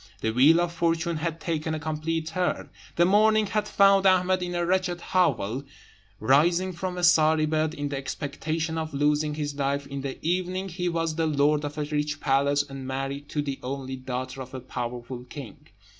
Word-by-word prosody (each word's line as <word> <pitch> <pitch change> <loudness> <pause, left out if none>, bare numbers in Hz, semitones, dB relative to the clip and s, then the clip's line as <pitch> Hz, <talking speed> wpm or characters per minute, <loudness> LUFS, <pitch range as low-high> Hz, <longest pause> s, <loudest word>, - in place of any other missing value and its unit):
The 110 - 0
wheel 140 +8 +6
of 175 -1 0
fortune 170 0 0
had 165 +1 -3
taken 160 -1 -2
a - - -4
complete 155 +1 -2
turn. 180 +3 -2 0.2
The 170 - +4
morning 215 +3 +4
had 210 +1 -1
found 195 -1 +5
Ahmed 185 0 +3
in 175 0 -3
a 175 0 0
wretched 180 -1 0
hovel, 135 - 0 0.6
rising 170 +10 +3
from 180 +1 -4
a 180 - -3
sorry 160 -2 +5
bed, 155 +1 0
in 145 -2 -3
the 140 - -3
expectation 155 +4 -3
of 160 -2 -4
losing 150 +1 +1
his 145 -1 -3
life; 140 0 -1
in 140 0 -5
the 135 -1 -5
evening 185 +2 -1
he 180 0 -2
was 165 -1 -1
the 165 -1 +1
lord 150 0 +2
of 145 +1 -5
a 150 - 0
rich 150 0 -2
palace, 140 +1 +2
and 135 -2 -7
married 135 +2 -4
to 150 - -1
the 140 -2 -4
only 130 0 -4
daughter 130 +1 -5
of 130 +1 -8
a - - -4
powerful 125 0 -5
king. 140 +1 -10
155 Hz, 190 wpm, -26 LUFS, 140-175 Hz, 0.6 s, wheel